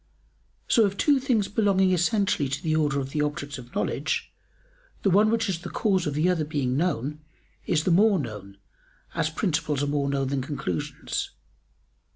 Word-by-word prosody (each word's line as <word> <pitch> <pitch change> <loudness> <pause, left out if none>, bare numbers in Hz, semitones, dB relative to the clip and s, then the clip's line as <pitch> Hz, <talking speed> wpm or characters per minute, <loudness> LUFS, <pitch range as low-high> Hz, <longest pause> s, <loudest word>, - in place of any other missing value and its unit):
So 230 - +5
of 200 -1 0
two 285 -3 +3
things 245 -7 +1
belonging 195 -3 +2
essentially 185 - +1
to 135 - -3
the 155 -2 +1
order 150 -3 +1
of 135 0 -4
the 150 - -1
objects 145 -1 -3
of 120 0 -13
knowledge, - - -2 0.7
the 195 - +3
one 210 +4 +5
which 225 0 +1
is 185 -4 -1
the 175 0 -7
cause 190 -5 +1
of 145 - -2
the 155 +4 +2
other 180 -4 +1
being 145 -4 -1
known, 150 -2 -1 0.5
is 155 -3 +2
the 180 - +1
more 200 +3 +5
known, 105 - -6 0.6
as 155 - 0
principles 155 -4 -1
are - - +2
more 140 -1 0
known 135 -1 0
than 140 -1 -1
conclusions. 145 +1 -3
155 Hz, 180 wpm, -26 LUFS, 140-195 Hz, 0.7 s, So